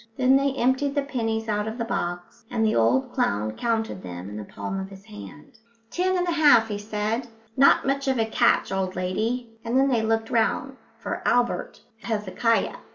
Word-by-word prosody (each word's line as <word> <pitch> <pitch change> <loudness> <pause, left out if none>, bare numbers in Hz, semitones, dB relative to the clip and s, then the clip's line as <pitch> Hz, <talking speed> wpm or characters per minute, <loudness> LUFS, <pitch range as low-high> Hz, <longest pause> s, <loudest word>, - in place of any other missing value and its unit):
Then 260 +1 +4
they 275 0 +2
emptied 265 +3 +1
the 285 - +1
pennies 225 -5 -2
out 210 0 -1
of 220 +2 -5
the 230 - -2
box, 175 -5 -4
and 225 -2 0
the 215 - +2
old 115 +3 +2
clown 105 +2 0
counted 225 - -2
them 90 +1 -7
in 105 - -8
the 105 - -5
palm 185 - -5
of 190 0 -6
his 195 0 -13
hand. 100 - -12 0.3
"Ten 370 +1 +1
and 355 0 0
a - - +1
half," 290 -9 +5
he 205 -1 -3
said, 215 +3 -2 0.3
"not 275 - +5
much 275 +1 -1
of 265 -1 +2
a 225 - +2
catch, 220 - +2
old 190 -1 -2
lady," 225 +6 -2
and 235 +2 0
then 270 +1 +4
they 240 -4 +2
looked 225 0 0
round 255 +4 0 0.2
for - - -5
Albert 245 0 0 0.2
Hezekiah. 225 +1 0
225 Hz, 195 wpm, -25 LUFS, 190-255 Hz, 0.3 s, half